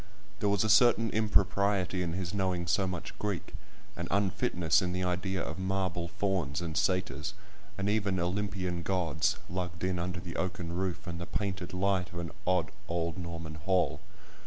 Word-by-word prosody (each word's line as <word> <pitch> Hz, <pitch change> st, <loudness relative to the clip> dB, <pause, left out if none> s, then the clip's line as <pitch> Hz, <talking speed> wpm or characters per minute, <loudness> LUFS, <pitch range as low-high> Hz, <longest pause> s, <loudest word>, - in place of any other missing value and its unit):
There 105 Hz, -, +2 dB
was 100 Hz, 0 st, +3 dB
a -, -, +2 dB
certain 115 Hz, +1 st, +6 dB
impropriety 100 Hz, -3 st, +2 dB
in 85 Hz, -2 st, -1 dB
his 90 Hz, 0 st, -3 dB
knowing 95 Hz, -3 st, 0 dB
so 95 Hz, +2 st, +2 dB
much 90 Hz, -2 st, -5 dB
Greek—an 105 Hz, -3 st, -5 dB
unfitness 90 Hz, -4 st, +2 dB
in 90 Hz, -1 st, -1 dB
the 90 Hz, 0 st, -1 dB
idea 90 Hz, +1 st, 0 dB
of 80 Hz, -, -4 dB
marble 95 Hz, -2 st, 0 dB
fauns, 85 Hz, -7 st, 0 dB
and 85 Hz, -3 st, -4 dB
satyrs, 90 Hz, -1 st, 0 dB, 0.4 s
and 95 Hz, 0 st, -1 dB
even 100 Hz, -3 st, +1 dB
Olympian 90 Hz, -1 st, -1 dB
gods, 85 Hz, -3 st, +1 dB
lugged 90 Hz, -1 st, -4 dB
in 95 Hz, -1 st, +1 dB
under 90 Hz, +1 st, -2 dB
the 90 Hz, -1 st, -6 dB
oaken 90 Hz, -2 st, -2 dB
roof 95 Hz, -1 st, -2 dB
and 85 Hz, -1 st, -4 dB
the 85 Hz, -, -5 dB
painted 95 Hz, -4 st, -2 dB
light 95 Hz, 0 st, +1 dB
of -, -, -6 dB
an 85 Hz, -1 st, -3 dB, 0.2 s
odd, 90 Hz, -3 st, +2 dB, 0.2 s
old 85 Hz, 0 st, -1 dB
Norman 85 Hz, -2 st, -5 dB
hall. 90 Hz, +4 st, +1 dB
90 Hz, 165 wpm, -31 LUFS, 85-95 Hz, 0.4 s, certain